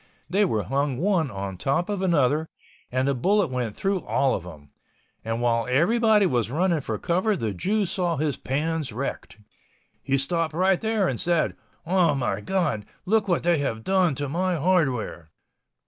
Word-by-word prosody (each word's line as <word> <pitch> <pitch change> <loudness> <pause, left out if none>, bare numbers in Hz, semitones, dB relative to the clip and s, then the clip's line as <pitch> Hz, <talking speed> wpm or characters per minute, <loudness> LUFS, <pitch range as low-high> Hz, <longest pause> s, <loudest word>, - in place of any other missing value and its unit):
They 200 +5 +2
were 110 - 0
hung 135 +4 -1
one 175 -2 +1
on 100 -3 -5
top 140 +6 0
of 205 -2 -2
another, 160 -3 +2 0.4
and 130 +2 0
the 140 - +2
bullet 190 +6 +1
went 125 -4 -2
through 195 -2 -1
all 135 -2 +1
of - - -2
them. 75 -5 -12 0.5
And 115 +1 -2
while 115 -1 +1
everyone 210 - +4
was 120 -3 0
running 170 +3 +1
for 110 -4 -3
cover 185 - 0
the 110 -8 -2
Jew 205 - 0
saw 175 -2 -1
his 150 -1 0
pans 150 +1 -2
wrecked. 125 +1 -5 0.6
He 135 - 0
stopped 155 +3 -1
right 185 +1 +2
there 220 -3 +1
and 125 - -2
said, 170 -2 +1 0.3
"Oh 170 -3 +3
my 130 -3 -1
God, 175 - -1 0.2
look 215 +2 +2
at - - -8
what 175 - +1
they 170 -2 +3
have 115 -6 -2
done 185 -3 +2
to 145 +2 -2
my 180 +5 0
hardware." 140 - 0
155 Hz, 180 wpm, -25 LUFS, 125-185 Hz, 0.6 s, everyone